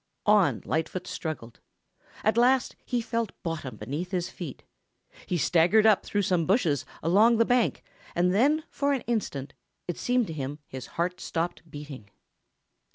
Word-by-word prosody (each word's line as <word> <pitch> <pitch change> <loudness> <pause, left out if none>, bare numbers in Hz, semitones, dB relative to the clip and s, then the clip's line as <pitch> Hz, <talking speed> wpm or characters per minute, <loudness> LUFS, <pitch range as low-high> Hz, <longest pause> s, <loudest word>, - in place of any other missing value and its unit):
On 210 -3 +4
Lightfoot 160 +3 -2
struggled. 150 -8 -6 0.6
At 215 - +3
last 250 +2 +3
he 245 -1 -1
felt 230 -2 -2
bottom 165 -6 -4
beneath 145 +11 -4
his 180 -2 -2
feet. 160 -8 -8 0.6
He 180 - 0
staggered 175 +7 +4
up 215 -3 +5
through 205 -1 -1
some 180 -3 +1
bushes 165 - +2 0.2
along 210 +8 +5
the 230 - +4
bank 245 -1 +1 0.3
and 180 +1 +2
then 290 +9 +3
for 280 0 +1
an 265 - -1
instant 145 - -3 0.3
it 175 - -4
seemed 250 -1 +2
to 165 - -6
him 145 -1 -4
his 130 -2 -8
heart 180 +2 -1
stopped 170 0 -3
beating. 145 -8 -9
180 Hz, 155 wpm, -27 LUFS, 155-225 Hz, 0.6 s, up